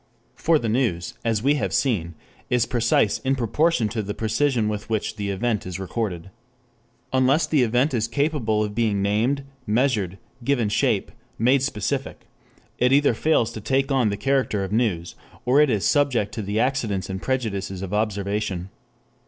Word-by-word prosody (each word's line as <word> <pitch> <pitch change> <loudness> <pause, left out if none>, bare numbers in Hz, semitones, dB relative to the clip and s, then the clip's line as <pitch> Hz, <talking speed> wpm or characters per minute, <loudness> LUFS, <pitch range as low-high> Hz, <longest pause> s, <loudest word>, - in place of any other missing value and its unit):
For 165 -1 +2
the 120 - -3
news, 110 -7 0
as 115 -2 0
we 140 +2 +4
have - - -1
seen, 90 - 0 0.3
is 125 -2 +2
precise 115 -4 +2
in 135 0 0
proportion 130 +1 +1
to 110 0 -2
the 105 0 -5
precision 115 +1 +1
with 105 0 -4
which 110 -1 -1
the 100 -2 -3
event 105 +2 -1
is 90 0 -5
recorded. 95 -2 -4 0.8
Unless 130 +4 +3
the 150 -4 +2
event 125 +5 +2
is 115 -2 0
capable 115 -4 0
of 105 -1 -4
being 105 -3 +1
named, 115 +8 +1 0.2
measured, 105 -5 +1 0.3
given 120 -4 +1
shape, - - +1 0.3
made 130 +4 +3
specific, 110 -7 -3 0.5
it 125 +1 +3
either 140 -1 +4
fails 120 -2 +1
to 110 - -7
take 135 +5 0
on 130 -5 +3
the 100 - -2
character 130 -4 0
of 95 - -5
news, 105 -7 0 0.3
or 130 +4 +5
it 150 - +4
is 105 -5 0
subject 130 -8 +2
to 110 - -3
the 105 +2 -2
accidents 115 -7 0
and 95 0 -5
prejudices 100 -7 -2
of 95 +1 -5
observation. 100 -3 -2
115 Hz, 170 wpm, -23 LUFS, 100-130 Hz, 0.8 s, or